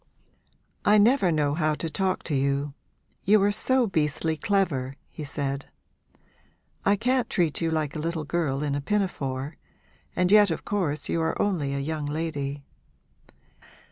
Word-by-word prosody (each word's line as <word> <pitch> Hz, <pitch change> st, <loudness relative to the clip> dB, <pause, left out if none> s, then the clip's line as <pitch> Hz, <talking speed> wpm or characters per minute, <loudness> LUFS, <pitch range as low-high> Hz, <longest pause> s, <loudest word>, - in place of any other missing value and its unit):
'I 210 Hz, +1 st, +5 dB
never 210 Hz, -3 st, +4 dB
know 150 Hz, -2 st, +1 dB
how 155 Hz, -1 st, +1 dB
to 165 Hz, -, -3 dB
talk 185 Hz, +4 st, -1 dB
to 160 Hz, -, -3 dB
you 140 Hz, +1 st, 0 dB, 0.5 s
you 210 Hz, +2 st, +5 dB
are 205 Hz, -, +4 dB
so 260 Hz, +4 st, +2 dB
beastly 160 Hz, -3 st, 0 dB
clever,' 150 Hz, -8 st, 0 dB, 0.2 s
he 155 Hz, -, -7 dB
said. 140 Hz, -1 st, -3 dB, 1.2 s
'I 200 Hz, -, +5 dB
can't 250 Hz, +4 st, +1 dB
treat 170 Hz, -4 st, +1 dB
you 165 Hz, -, +1 dB
like 155 Hz, -2 st, -1 dB
a -, -, -3 dB
little 165 Hz, 0 st, -2 dB
girl 150 Hz, -4 st, -1 dB
in 145 Hz, -2 st, -1 dB
a 145 Hz, -, -1 dB
pinafore 145 Hz, -7 st, -2 dB, 0.6 s
and 180 Hz, +1 st, +2 dB
yet 210 Hz, -1 st, +7 dB
of 160 Hz, -, -3 dB
course 160 Hz, -8 st, -1 dB
you 165 Hz, -, 0 dB
are 160 Hz, 0 st, -1 dB
only 150 Hz, -9 st, 0 dB
a -, -, -1 dB
young 150 Hz, +1 st, -3 dB
lady. 145 Hz, -2 st, -3 dB
160 Hz, 155 wpm, -26 LUFS, 145-195 Hz, 1.2 s, yet